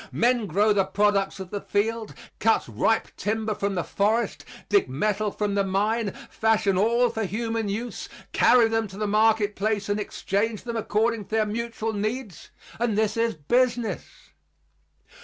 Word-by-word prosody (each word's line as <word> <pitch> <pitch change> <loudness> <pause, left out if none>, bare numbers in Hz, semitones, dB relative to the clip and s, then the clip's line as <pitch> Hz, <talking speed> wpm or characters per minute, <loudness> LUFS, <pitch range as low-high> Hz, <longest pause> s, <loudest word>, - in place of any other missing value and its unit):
Men 240 -2 +2
grow 205 +5 +3
the 200 -1 +3
products 195 0 +1
of 190 -1 -8
the 205 - -3
field, 220 +2 -1 0.2
cut - - +2
ripe - - +1
timber 220 +1 -1
from 200 -1 -2
the 175 - -1
forest, 215 +2 0 0.2
dig 200 -9 +2
metal 210 +9 0
from 205 0 -2
the 200 0 +2
mine, 205 +3 0 0.2
fashion 215 -3 +1
all 235 +5 +3
for 220 - -2
human 225 +1 -2
use, 230 +4 -4 0.2
carry 240 -2 +5
them 225 -1 0
to 190 0 -11
the 210 - -1
market 215 0 +2
place 205 -1 -1
and 205 +1 0
exchange 210 +1 -2
them 235 -1 -5
according 225 0 0
to - - -28
their 220 0 +1
mutual 225 +1 -3
needs 215 -2 -4 0.3
and 230 -3 0
this 215 -1 +1
is 230 -2 0
business. 240 - -1
215 Hz, 160 wpm, -25 LUFS, 200-225 Hz, 0.3 s, carry